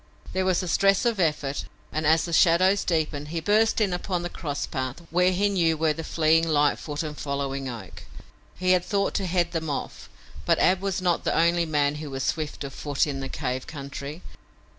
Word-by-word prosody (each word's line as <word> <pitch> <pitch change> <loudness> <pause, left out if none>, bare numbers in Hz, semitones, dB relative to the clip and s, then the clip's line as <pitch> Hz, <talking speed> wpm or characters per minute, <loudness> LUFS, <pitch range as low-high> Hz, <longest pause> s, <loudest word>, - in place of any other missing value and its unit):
There 190 0 0
was 185 0 +2
a - - -4
stress 195 +6 +3
of 230 -4 +1
effort 150 -5 0 0.3
and, 155 0 -1
as 160 +1 +4
the 170 - -5
shadows 185 +4 +4
deepened, 155 -3 -1
he 165 +2 -3
burst 215 +6 +2
in 200 -4 +1
upon 180 0 -2
the 175 - -4
cross 145 -4 -3
path 130 +4 -4
where 180 +2 +3
he 195 +3 +2
knew 170 -5 +2
were 155 0 +2
the 165 - -6
fleeing 160 +1 +2
Lightfoot 150 0 +1
and 150 -1 -5
following 140 -2 -3
Oak. 110 -7 -9 0.5
He 185 0 +1
had 180 -1 +4
thought 200 +1 0
to 195 -3 -1
head 175 -1 +1
them 160 -2 -3
off, 140 - -5 0.3
but - - +3
Ab 185 0 +3
was 195 -2 -2
not 175 -2 +1
the - - 0
only 170 0 +3
man 145 -2 +1
who 150 -1 -6
was 135 -1 -4
swift 155 0 -2
of 140 -2 -6
foot 145 0 0
in 140 -3 -4
the 135 0 -5
cave 130 -2 -3
country. 140 +2 -7
160 Hz, 205 wpm, -25 LUFS, 145-180 Hz, 0.5 s, as